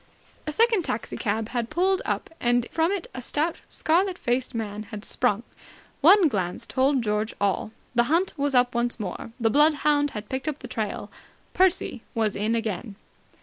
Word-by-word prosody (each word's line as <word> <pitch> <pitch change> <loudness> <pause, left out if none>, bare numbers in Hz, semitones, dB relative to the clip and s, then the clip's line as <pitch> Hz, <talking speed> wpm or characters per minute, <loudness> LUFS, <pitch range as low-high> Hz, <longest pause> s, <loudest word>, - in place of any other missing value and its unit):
A - - 0
second 450 +3 +3
taxi 230 - -3
cab 220 0 -1
had 235 -2 -2
pulled 370 +4 +2
up, - - -2
and 240 0 +2
from 330 +2 +2
it 400 -4 -2
a 255 - -5
stout, 305 +6 -1
scarlet 360 +3 +1
faced 245 +1 -1
young - - 0
man 210 -1 -4
had 210 -2 -7
sprung. 230 -3 0 0.6
One 360 +4 +7
glance 185 -9 -2
told 265 -1 +2
George 210 +1 -1
all. 200 +2 0 0.2
The 240 -1 +3
hunt 345 +4 +2
was 285 -2 0
up 245 0 +4
once 240 0 0
more. 205 +2 -5
The 225 -1 +2
bloodhound 295 0 +4
had 210 0 -6
picked 260 +5 -4
up 300 -2 -1
the - - -9
trail. - - -4 0.4
Percy 370 -9 +2
was 220 -3 +1
in 215 +3 0
again! 220 -1 -3
250 Hz, 180 wpm, -25 LUFS, 220-310 Hz, 0.6 s, One